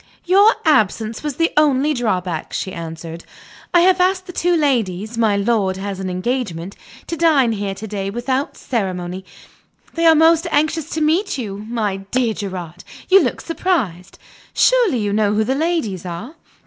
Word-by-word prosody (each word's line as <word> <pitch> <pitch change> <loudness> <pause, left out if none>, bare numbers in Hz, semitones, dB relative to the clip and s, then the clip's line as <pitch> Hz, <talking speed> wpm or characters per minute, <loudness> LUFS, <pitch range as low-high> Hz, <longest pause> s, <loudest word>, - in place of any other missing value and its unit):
"Your 400 +5 +5
absence 220 -6 +2
was 295 -3 -4
the 330 +3 +1
only 295 0 +3
drawback," 185 - -2
she 190 - -3
answered. 165 0 -7 0.5
"I 345 - +5
have 365 0 +4
asked 370 0 +1
the 360 - -9
two 350 0 +1
ladies 225 - 0
(my 220 -3 +2
lord 200 -3 +1
has 195 0 -5
an 190 -1 -3
engagement) 185 -2 -3 0.3
to 335 - -4
dine 305 -8 +3
here 200 -2 -3
to 210 - -7
day, 200 -2 -4
without 260 +7 -2
ceremony. 185 -5 -3 0.7
They 330 0 +2
are 325 - +7
most 325 +1 +4
anxious 310 +1 0
to 320 - -1
meet 325 +4 +1
you. 210 -3 -6
My 215 -5 -1
dear 225 +4 -1
Gerard! 180 -5 -7 0.3
you 385 +1 +7
look - - -2
surprised. 265 - -2 0.4
Surely 480 - +3
you 205 -2 -1
know 210 -1 +2
who 220 - +2
the 255 +5 0
ladies 285 - -1
are?" 185 - -7
230 Hz, 165 wpm, -19 LUFS, 195-315 Hz, 0.7 s, are